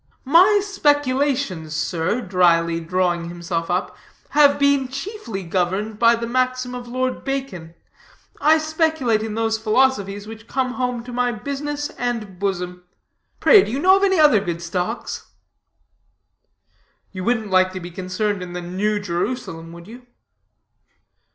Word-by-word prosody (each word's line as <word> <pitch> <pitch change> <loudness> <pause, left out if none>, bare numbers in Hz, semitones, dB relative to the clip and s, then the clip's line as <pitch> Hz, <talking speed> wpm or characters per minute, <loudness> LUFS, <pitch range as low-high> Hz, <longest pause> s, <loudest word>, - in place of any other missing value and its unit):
"My 370 +9 +5
speculations, 280 - 0
sir," 175 +8 -1
dryly 170 -4 +2
drawing 175 0 -1
himself 170 -1 -4
up, 180 +2 -1 0.3
"have 290 -1 +5
been 280 -2 +2
chiefly 275 - -6
governed 190 +5 -2
by 235 0 +5
the 230 0 -4
maxim 255 +1 -1
of 245 -1 -7
Lord 255 +1 -2
Bacon; 230 -12 -5 0.7
I 310 +2 +5
speculate 315 -7 0
in 220 -1 -4
those 225 -1 0
philosophies 215 -3 +1
which 220 +1 -11
come 255 0 -1
home 250 -2 -2
to 245 0 -9
my 245 0 +1
business 285 +5 -4
and 225 -7 -3
bosom 180 -2 -3 0.6
pray, 410 -5 +7
do - - -5
you 255 - -2
know 370 +6 +5
of 390 - -1
any 380 -3 +3
other 295 -8 +6
good 170 -3 -4
stocks?" 180 +6 -4 1.8
"You 185 -2 -6
wouldn't 220 -2 -1
like 185 0 +4
to 185 - -5
be 175 0 -8
concerned 185 +3 -2
in 180 -1 -7
the 180 - -4
New 205 +4 -1
Jerusalem, 175 -3 -4
would 170 +1 -12
you?" 245 +3 -13
220 Hz, 145 wpm, -21 LUFS, 180-265 Hz, 1.8 s, pray